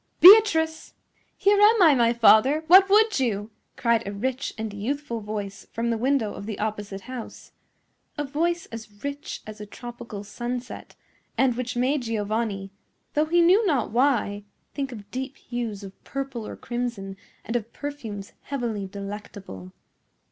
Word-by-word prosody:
Beatrice!" 335 Hz, -5 st, +7 dB, 0.4 s
"Here 405 Hz, +1 st, +4 dB
am 425 Hz, -1 st, +6 dB
I, 315 Hz, -4 st, +7 dB
my 235 Hz, -3 st, +3 dB
father. 235 Hz, +6 st, +5 dB
What 380 Hz, +4 st, +7 dB
would 430 Hz, -2 st, +4 dB
you?" 215 Hz, -4 st, -1 dB, 0.3 s
cried 235 Hz, -2 st, +2 dB
a -, -, -3 dB
rich 255 Hz, +6 st, -2 dB
and 220 Hz, -1 st, -4 dB
youthful 235 Hz, +3 st, -3 dB
voice 205 Hz, -2 st, -6 dB
from 235 Hz, +1 st, -1 dB
the -, -, +1 dB
window 250 Hz, -3 st, +1 dB
of 200 Hz, -, -8 dB
the 215 Hz, -, -4 dB
opposite 205 Hz, -2 st, -4 dB
house—a 255 Hz, +4 st, -10 dB
voice 330 Hz, +5 st, -1 dB
as 220 Hz, -3 st, -10 dB
rich 285 Hz, 0 st, -5 dB
as 215 Hz, 0 st, -9 dB
a 210 Hz, -, -7 dB
tropical 235 Hz, -3 st, -8 dB
sunset, 240 Hz, +4 st, -6 dB, 0.4 s
and 260 Hz, -3 st, +3 dB
which 250 Hz, 0 st, -4 dB
made 265 Hz, +3 st, +1 dB
Giovanni, 215 Hz, -3 st, -2 dB, 0.4 s
though 300 Hz, +1 st, +2 dB
he 345 Hz, +2 st, +4 dB
knew 370 Hz, +6 st, +5 dB
not 270 Hz, -, +1 dB
why, 235 Hz, -5 st, +1 dB, 0.3 s
think 275 Hz, -2 st, -3 dB
of 210 Hz, -3 st, -10 dB
deep 260 Hz, +1 st, -5 dB
hues 230 Hz, -5 st, -5 dB
of 195 Hz, -1 st, -12 dB
purple 270 Hz, -5 st, -5 dB
or -, -, -7 dB
crimson 235 Hz, -5 st, -4 dB, 0.3 s
and 230 Hz, -, -4 dB
of 235 Hz, -1 st, -2 dB
perfumes 230 Hz, -9 st, -7 dB
heavily 235 Hz, -8 st, -3 dB
delectable. 200 Hz, -, -8 dB
240 Hz, 150 wpm, -25 LUFS, 210-280 Hz, 0.4 s, Beatrice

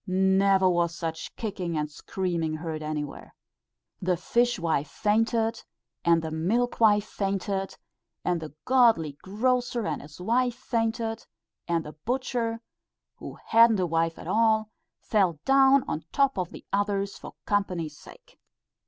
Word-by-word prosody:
Never 190 Hz, +1 st, +3 dB
was 170 Hz, -2 st, +1 dB
such 165 Hz, -1 st, -5 dB
kicking 180 Hz, -7 st, -3 dB
and 150 Hz, 0 st, -1 dB
screaming 170 Hz, -1 st, -2 dB
heard 155 Hz, -1 st, -5 dB
anywhere. 150 Hz, -2 st, -5 dB, 0.7 s
The 180 Hz, -1 st, +1 dB
fishwife 175 Hz, -11 st, +1 dB
fainted, 225 Hz, -, 0 dB, 0.4 s
and 170 Hz, -1 st, +3 dB
the 160 Hz, -, -4 dB
milkwife 210 Hz, +4 st, +2 dB
fainted, 195 Hz, -1 st, -3 dB, 0.5 s
and 175 Hz, -2 st, 0 dB
the 150 Hz, -2 st, -8 dB
godly 225 Hz, -, +3 dB
grocer 245 Hz, +3 st, 0 dB
and -, -, -2 dB
his 150 Hz, +3 st, -13 dB
wife 240 Hz, +5 st, +1 dB
fainted, 225 Hz, -2 st, -2 dB, 0.4 s
and 170 Hz, -1 st, 0 dB
the 150 Hz, -, -8 dB
butcher 235 Hz, -, -2 dB, 0.6 s
who -, -, -9 dB
hadn't 230 Hz, -2 st, +6 dB
a 185 Hz, -, +2 dB
wife 165 Hz, 0 st, 0 dB
at -, -, -10 dB
all, 220 Hz, +2 st, +2 dB, 0.3 s
fell 185 Hz, -8 st, +1 dB
down 270 Hz, 0 st, +5 dB
on 155 Hz, -, -3 dB
top 275 Hz, -1 st, +2 dB
of 180 Hz, -2 st, -2 dB
the -, -, -12 dB
others, 200 Hz, 0 st, 0 dB
for -, -, -10 dB
company's 180 Hz, -7 st, -1 dB
sake. -, -, -16 dB
195 Hz, 135 wpm, -27 LUFS, 165-230 Hz, 0.7 s, hadn't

